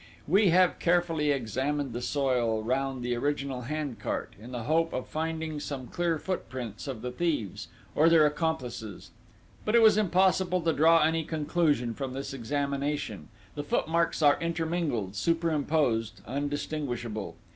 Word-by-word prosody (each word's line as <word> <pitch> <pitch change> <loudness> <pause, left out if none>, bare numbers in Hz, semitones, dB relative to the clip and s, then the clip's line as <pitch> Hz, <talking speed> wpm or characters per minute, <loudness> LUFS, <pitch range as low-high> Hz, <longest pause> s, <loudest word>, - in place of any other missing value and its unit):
"We 195 +5 +5
have 180 +1 +4
carefully 170 -3 +2
examined 135 +1 -1
the 120 - -4
soil 125 -4 0
round 130 +1 -1
the 125 0 0
original 140 0 -2
hand 140 -2 -4
cart, - - -3
in 120 +3 -10
the 120 -2 -4
hope 165 +5 +1
of 130 - -3
finding 160 -1 -3
some 140 -3 -5
clear 170 +5 -1
footprints 130 - -5
of 130 -5 -5
the 125 - -3
thieves, 145 - -2 0.3
or 160 +2 +5
their 165 -2 +6
accomplices; 130 - -3 0.5
but 215 - +1
it 235 - +7
was 215 -1 +6
impossible 185 -2 +2
to 165 0 +1
draw 165 +2 +5
any 160 +1 +2
conclusion 150 -6 0
from 135 +1 -5
this 135 +1 -5
examination 140 - -2 0.3
the 145 - -4
footmarks 165 +2 0
are 145 -1 +5
intermingled, 165 - -1
superimposed, 145 - 0
undistinguishable. 135 -5 -3
145 Hz, 145 wpm, -28 LUFS, 125-165 Hz, 0.5 s, it